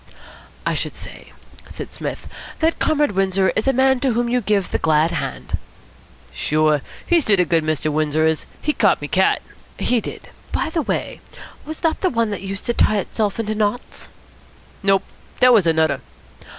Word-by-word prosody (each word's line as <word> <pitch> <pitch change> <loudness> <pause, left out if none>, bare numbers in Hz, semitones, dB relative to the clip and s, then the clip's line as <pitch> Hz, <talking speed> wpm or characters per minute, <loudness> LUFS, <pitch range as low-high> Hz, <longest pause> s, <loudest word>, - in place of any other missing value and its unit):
"I - - +1
should - - -2
say," - - -9 0.4
said - - -7
Psmith, - - -5 0.3
"that 325 +1 +1
Comrade 295 -4 +2
Windsor 195 -1 +1
is 220 - 0
a - - +6
man 265 0 +3
to 260 -2 +1
whom 240 +1 0
you 250 +1 +1
give 205 -3 0
the - - 0
glad 160 +1 +3
hand." 170 - -4 0.7
"Sure. 155 -1 +2 0.2
He's 340 -3 +3
to 205 -2 +5
the 180 - +3
good, 165 -1 +2
Mr. 155 -1 0
Windsor 155 +1 +1
is. 160 -1 0 0.2
He 300 - +1
caught 205 -7 +3
me 145 - -5
cat." 190 +5 +2 0.3
"He 245 -2 +1
did. - - -8 0.2
By - - -1
the 325 - 0
way, - - -3 0.5
was 315 +1 -7
that 325 -1 0
the 370 - +2
one 230 -5 0
that 200 - -4
used 195 0 -5
to 240 - +1
tie 215 -2 +3
itself 205 +1 -2
into 215 -1 -1
knots?" 215 +3 -2 0.7
"Nope. 195 -1 +3 0.4
Dat 250 0 +7
was 200 -7 +5
anudder." 160 -4 +2
205 Hz, 180 wpm, -21 LUFS, 165-245 Hz, 0.7 s, Dat